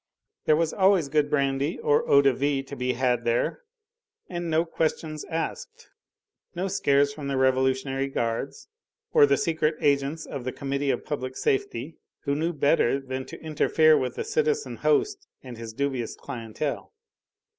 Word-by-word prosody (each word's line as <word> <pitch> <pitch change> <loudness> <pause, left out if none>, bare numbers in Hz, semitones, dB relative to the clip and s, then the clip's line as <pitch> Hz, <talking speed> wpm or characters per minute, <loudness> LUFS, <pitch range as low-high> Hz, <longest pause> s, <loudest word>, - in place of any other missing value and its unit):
There 155 - +5
was 165 0 0
always 190 -6 +3
good 150 0 +2
brandy 140 +1 0
or 145 - +1
eau 140 0 +6
de 135 -1 +4
vie 140 +1 0
to 140 +1 -9
be 125 -1 -1
had 125 -1 +1
there, 120 - 0 0.7
and 175 -1 -4
no 160 +1 +2
questions 155 -2 -2
asked, 465 - -5 0.6
no 180 +3 -1
scares 140 -6 +2
from 145 -1 -7
the 135 -1 -1
revolutionary 130 +1 +1
guards 120 - -3 0.5
or 450 -2 +7
the - - +3
secret 160 -5 0
agents 140 +2 +1
of 135 -3 -6
the 130 - -3
Committee 140 +1 -2
of 125 - -1
Public 130 -3 -4
Safety, 405 -2 -1 0.2
who 140 - -1
knew 160 +3 0
better 140 -3 +2
than 130 -1 -5
to - - -9
interfere 155 0 +4
with 130 -3 -1
the - - -3
citizen 450 0 -1
host 405 -3 +1 0.2
and 125 -3 -9
his 115 -1 -6
dubious 130 -1 -2
clientele. 115 +5 -5
145 Hz, 160 wpm, -26 LUFS, 130-165 Hz, 0.7 s, or